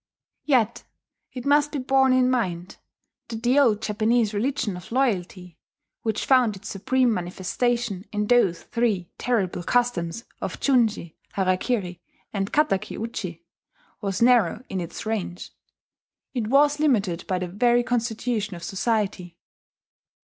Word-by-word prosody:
Yet 240 -6 +2 0.5
it 250 -2 -7
must 290 +1 +3
be - - -1
borne 265 0 +3
in 255 0 +4
mind 180 -8 -2 0.5
that 225 0 -6
the 250 +4 +4
old 225 -6 +3
Japanese 220 +1 +1
religion 215 -2 -1
of 180 - -11
loyalty, 185 -8 -1 0.4
which 220 -2 -2
found 250 -5 +4
its 200 +3 -9
supreme 245 +5 +1
manifestation 200 +3 -2
in 210 0 -1
those 210 -7 +3
three 215 -7 -1
terrible 200 -8 0
customs 230 -2 0 0.2
of - - -4
junshi, 225 - +1 0.2
harakiri, 185 -1 0 0.3
and 195 -1 -2
kataki 295 -11 +1
uchi, 185 -7 -5 0.6
was 195 +1 0
narrow 235 -3 +4
in 190 - -2
its 170 - -7
range. 205 -5 -4 0.8
It 235 -5 -2
was 290 +4 +4
limited 205 - +1
by 185 - 0
the 180 0 -3
very 240 +6 +2
constitution 230 -3 -1
of 170 - -10
society. 190 -2 -2
220 Hz, 130 wpm, -24 LUFS, 185-245 Hz, 0.8 s, in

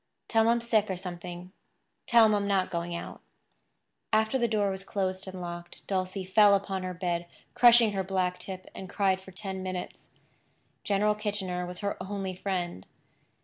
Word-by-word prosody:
"Tell 225 - +3
him 220 - +3
I'm 235 0 +3
sick, 220 -3 +2
or 190 - -2
something. 180 0 -7 0.6
Tell 235 -1 +7
him 215 - +4
I'm 200 -1 +1
not 195 -2 +1
going 170 0 -3
out." 170 - -7 0.9
After 220 +4 +2
the 240 - +2
door 205 -3 +1
was 190 0 -4
closed 190 -1 -2
and 190 -1 -7
locked, 175 -1 -7
Dulcie 185 0 -2
fell 200 +2 +6
upon 195 -1 -2
her 185 0 -4
bed, 175 -1 -2 0.3
crushing 240 -2 +7
her 195 -1 -1
black 185 -1 -1
tip, 185 -1 -7
and 190 - -8
cried 195 -2 +1
for 190 - -13
ten 190 0 -5
minutes. 185 -1 -6 0.7
General 210 +1 +2
Kitchener 195 -4 -3
was 180 0 -7
her 200 0 -2
only 195 -1 -4
friend. 180 - -3
190 Hz, 175 wpm, -29 LUFS, 180-205 Hz, 0.9 s, Tell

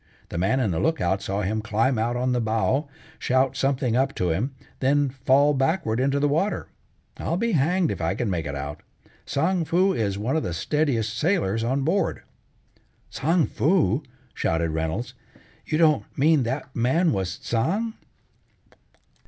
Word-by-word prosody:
The 85 - -3
man 95 +9 +2
in 110 -7 +1
the 80 - -1
lookout 95 - 0
saw 100 +1 -2
him 110 +3 -1
climb 110 +3 +1
out 120 +2 0
on 125 +1 0
the 125 -1 +1
bow, 115 +6 0 0.3
shout 130 +1 +1
something 135 -3 0
up 135 +2 +1
to 90 -2 0
him, 120 +12 -2 0.2
then 140 +1 +2
fall 135 +3 +3
backward 135 -4 0
into 140 +2 +1
the 145 - +2
water. 165 +9 -1 0.5
I'll 170 - -2
be 230 +4 0
hanged 170 +2 +2
if - - -4
I - - 0
can 120 - -2
make 85 -6 -2
it 70 - -4
out. 70 +1 -6 0.5
Tsang 170 +5 +1
Foo 185 +4 +2
is 100 - -1
one 115 +8 -1
of 160 - +1
the 85 - -3
steadiest 120 - 0
sailors 120 - +1
on 130 +4 0
board." 180 +7 0 0.9
"Tsang 160 +3 +2
Foo!" 150 - +2 0.3
shouted 80 0 0
Reynolds. 80 +10 -3 0.5
"You 155 - 0
don't 155 -3 +4
mean 155 +1 +4
that 130 +2 -4
man 145 +9 +2
was 95 -2 -2
Tsang?" 195 - -1
130 Hz, 165 wpm, -24 LUFS, 110-155 Hz, 0.9 s, don't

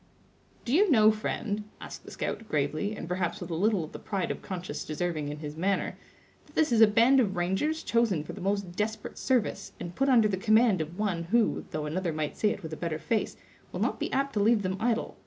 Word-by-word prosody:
"Do 245 - -1
you 390 +6 +5
know, 220 -6 +6
friend," 215 -1 -3
asked - - -9
the - - -9
scout, 225 - -4
gravely, 155 +8 -1
and 165 - -7
perhaps 180 +2 -2
with 175 -2 -7
a - - -1
little 195 +2 +2
of 155 - -8
the - - -8
pride 195 -5 -2
of - - -5
conscious 185 -1 -5
deserving 155 -2 -2
in 150 - -5
his 150 -1 -7
manner, 190 +4 0 0.5
"that - - -21
this 310 -4 +3
is 230 -1 +4
a 220 - +10
band 230 +6 +5
of 200 -6 +1
rangers 190 - 0
chosen 225 -9 +1
for - - -8
the 200 - -9
most 195 -1 -1
desperate 215 +2 -3
service, 235 -6 0
and 175 - -6
put 270 +8 +1
under 235 -5 +6
the 195 -2 -1
command 215 -2 +4
of 160 +3 -6
one 190 -6 -1
who, 225 +5 +1
though 155 -1 -3
another 170 +3 -1
might 155 -1 -3
say 215 - +2
it 205 - -4
with 160 -1 -6
a - - -5
better 165 -3 -2
face, 220 +7 -1 0.3
will - - -5
not - - 0
be - - -2
apt 275 +1 0
to 210 - 0
leave 215 +1 +3
them 185 0 -1
idle. 230 0 -1
200 Hz, 235 wpm, -28 LUFS, 170-225 Hz, 0.5 s, a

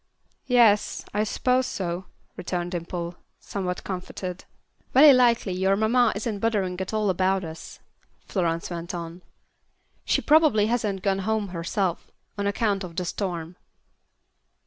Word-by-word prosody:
"Yes, 235 -5 +3
I 210 +1 +1
s'pose 255 +4 +1
so," 180 0 -3 0.3
returned 175 -1 -3
Dimple, 170 0 -4 0.2
somewhat 185 -3 -4
comforted. 185 -1 -6 0.5
"Very 280 +2 +9
likely 235 -6 +3
your 190 +2 +2
mamma 225 +3 +3
isn't 210 0 -3
bothering 195 -5 0
at 190 - -4
all 215 -2 +1
about 190 +1 +1
us," 160 -1 -9 0.5
Florence 170 -3 -1
went 170 +1 -5
on. 170 +1 -7 0.8
"She - - +1
probably 300 -9 +5
hasn't 210 -4 -1
gone 195 -1 +1
home 210 0 -1
herself, 180 +1 -2 0.3
on 200 -1 -2
account 205 -1 0
of 170 -2 -8
the 180 - -2
storm." 175 -2 -4
195 Hz, 130 wpm, -25 LUFS, 180-220 Hz, 0.8 s, Very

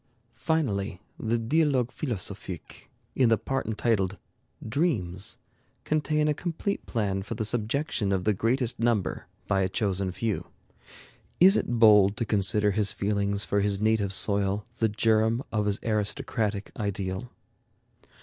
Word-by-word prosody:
Finally, 115 - -1 0.2
the 115 +1 0
'Dialogues 130 0 +1
philosophiques,' 100 - -5 0.3
in 125 -3 +3
the 115 - +4
part 135 +4 -3
entitled 105 -4 0 0.5
'Dreams,' 110 - 0 0.5
contain 150 0 +1
a 150 - +3
complete 175 +5 -3
plan 100 -5 -1
for 95 - -6
the 110 - -2
subjection 120 0 -1
of 95 -2 0
the 105 - +2
greatest 120 +4 0
number 115 -8 0 0.2
by 95 -1 +1
a 95 - +1
chosen 95 -3 -1
few.... 110 +2 -3 0.9
Is 190 +3 +7
it 120 - 0
bold 105 -3 +6
to 115 - -1
consider 105 0 +2
his 100 0 +2
feeling 100 0 -1
for 100 0 +1
his 100 -1 0
native 110 -2 +1
soil 100 0 0
the 110 - +2
germ 110 +3 +2
of 105 -2 0
his 100 -1 0
aristocratic 110 -1 -1
ideal? 100 +1 -3
110 Hz, 135 wpm, -27 LUFS, 100-120 Hz, 0.9 s, Is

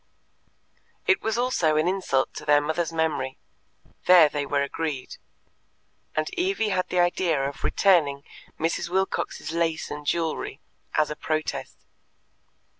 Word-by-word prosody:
It 380 - +3
was 220 +1 -1
also 240 -11 +2
an 155 +2 +2
insult 180 -8 0
to - - -7
their 145 0 +5
mother's 160 +2 -1
memory; 160 -5 -1 0.7
there 175 -4 +8
they 145 -1 -3
were 140 -1 +1
agreed, 140 -2 -4 1.0
and 155 0 0
Evie 360 - 0
had 185 -2 0
the 180 - 0
idea 175 -5 +2
of 140 - -8
returning 150 -8 +3 0.4
Mrs. 165 +1 -1
Wilcox's 190 -3 -1
lace 165 -1 -1
and 150 0 -5
jewellery 165 0 -1 0.4
"as 155 -1 +2
a - - -3
protest." 155 0 -3
160 Hz, 130 wpm, -25 LUFS, 150-180 Hz, 1.0 s, there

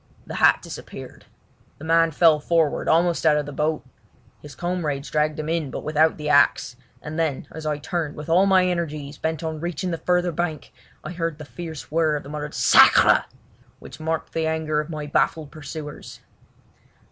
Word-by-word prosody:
The - - -8
hat - - +5
disappeared. - - -10 0.5
The - - -13
man 165 +1 +3
fell 160 0 +4
forward, 160 -1 0
almost 170 +1 +2
out 155 -2 +4
of 150 - -1
the 145 - -7
boat. 150 +1 -2 0.6
His 150 - -11
comrades 160 -6 -3
dragged 150 0 0
him 155 - -4
in 160 -3 -1
but - - -6
without 155 +1 +2
the 150 -1 -5
axe, 145 -4 +3 0.3
and 155 +2 -5
then 155 -5 -1
as 160 0 -7
I 150 -1 -1
turned 155 0 -3
with 150 - -8
all 180 +4 +4
my 190 -1 +4
energies 155 -5 -3
bent 160 +1 -3
on 160 -1 -4
reaching 175 +2 -3
the 165 - -3
further 180 0 +1
bank, 160 -3 -4 0.3
I - - -6
heard 165 -3 -3
the 155 - -9
fierce 160 -1 -8
whirr 160 -1 +2
of 145 - -4
the 140 - -11
muttered 150 0 -6
"Sacre!" - - +6 0.5
which - - -12
marked 160 0 -3
the 160 -1 -1
anger 160 -1 -1
of 150 +2 -4
my 155 -2 -5
baffled 150 +1 0
pursuers. 150 -1 -9
155 Hz, 185 wpm, -23 LUFS, 150-165 Hz, 0.6 s, Sacre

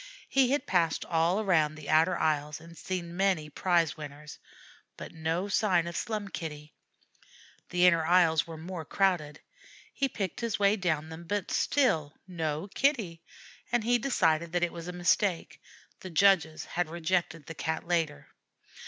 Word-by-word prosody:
He 265 -2 +3
had 285 +2 0
passed 170 -3 +1
all 170 +4 +1
around 160 -7 +2
the 155 -2 -10
outer 165 +4 +3
aisles 150 -1 0
and 165 +1 -14
seen 170 +1 -5
many 180 -6 0
prize 170 -1 +1
winners, 150 -1 -10 0.6
but - - -8
no 165 +4 -2
sign 190 -4 +2
of 170 0 -6
Slum 215 -4 -3
Kitty. 150 -4 -7 1.0
The 180 0 +3
inner 170 -2 +5
aisles 165 -2 +3
were 165 -1 -8
more 170 +1 -6
crowded. 170 -3 0 0.5
He 275 -1 0
picked 195 -5 -4
his 230 -2 -1
way 200 0 +3
down 160 -6 -1
them, 160 +1 -9
but 205 +1 -2
still 160 - +1
no 160 -1 -3
Kitty, 220 - 0 0.5
and 240 -2 +1
he 240 +2 +2
decided 170 - +1
that 175 0 +1
it 175 - 0
was 170 0 -8
a - - -3
mistake; 180 0 0 0.4
the 185 - -8
judges 165 -2 +3
had 175 -2 -2
rejected 170 -2 -1
the 165 - -7
Cat 160 0 -3
later. 165 -4 -1
170 Hz, 160 wpm, -29 LUFS, 160-190 Hz, 1.0 s, inner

